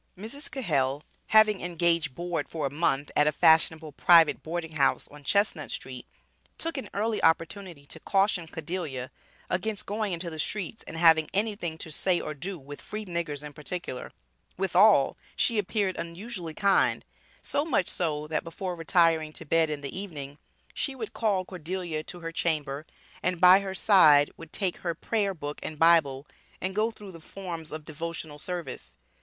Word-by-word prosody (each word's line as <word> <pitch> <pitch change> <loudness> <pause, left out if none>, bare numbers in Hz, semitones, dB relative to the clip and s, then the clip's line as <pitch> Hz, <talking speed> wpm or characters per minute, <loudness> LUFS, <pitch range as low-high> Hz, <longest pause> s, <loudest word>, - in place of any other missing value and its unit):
Mrs. 230 - -6
Cahell, 145 - 0 0.2
having 215 -2 +5
engaged 170 -4 0
board 175 +1 -3
for 155 -3 -3
a 135 - -1
month 145 -2 0
at 150 - +4
a - - +4
fashionable 160 0 +3
private 165 +2 +5
boarding 165 0 -4
house 145 -3 +1
on 145 0 -14
Chestnut 180 -2 +1
street, 130 -2 -6 0.5
took 330 0 -2
an - - -8
early 215 +2 -1
opportunity 165 -1 0
to - - -9
caution 195 -3 +1
Cordelia 155 -6 -4 0.4
against 210 +3 -2
going 210 0 -2
into 170 0 -4
the 160 - -7
streets, 210 +5 -3
and - - -7
against 165 - -4
having 160 -1 +6
anything 200 -6 -1
to 160 - -5
say 180 +4 +1
or 155 - -4
do 180 +6 -5
with 145 0 -10
"free 215 0 -6
niggers 170 -5 -3
in 150 -1 -8
particular"; 150 -3 -5 0.5
withal, 190 -3 +4 0.2
she 230 -3 +2
appeared 200 -1 0
unusually 170 -1 -6
kind, 200 -1 +2 0.4
so 285 - +1
much 300 - +1
so, 150 -4 -1
that 155 +1 -2
before 180 +2 -5
retiring 165 -2 +2
to 160 - -6
bed 160 +1 +3
in 150 -1 -4
the 140 -2 -5
evening, 150 -7 -6 0.3
she 275 - -2
would 225 -5 -6
call 200 -5 0
Cordelia 175 -2 -4
to 175 - -7
her 165 0 -5
chamber, 155 -3 -2 0.3
and 180 -1 0
by 180 +2 +8
her 195 -1 -5
side 155 -9 +6
would 165 -1 -12
take 190 -4 0
her 170 -2 -3
Prayer 200 +1 -1
book 145 -2 -6
and 155 - -5
Bible, 150 -4 +4 0.3
and 190 +1 -3
go 215 +3 +1
through 210 -3 -11
the 165 - -11
forms 170 -2 -7
of 155 -1 -7
devotional 160 -1 -5
service. 165 - -5
170 Hz, 170 wpm, -28 LUFS, 155-195 Hz, 0.5 s, by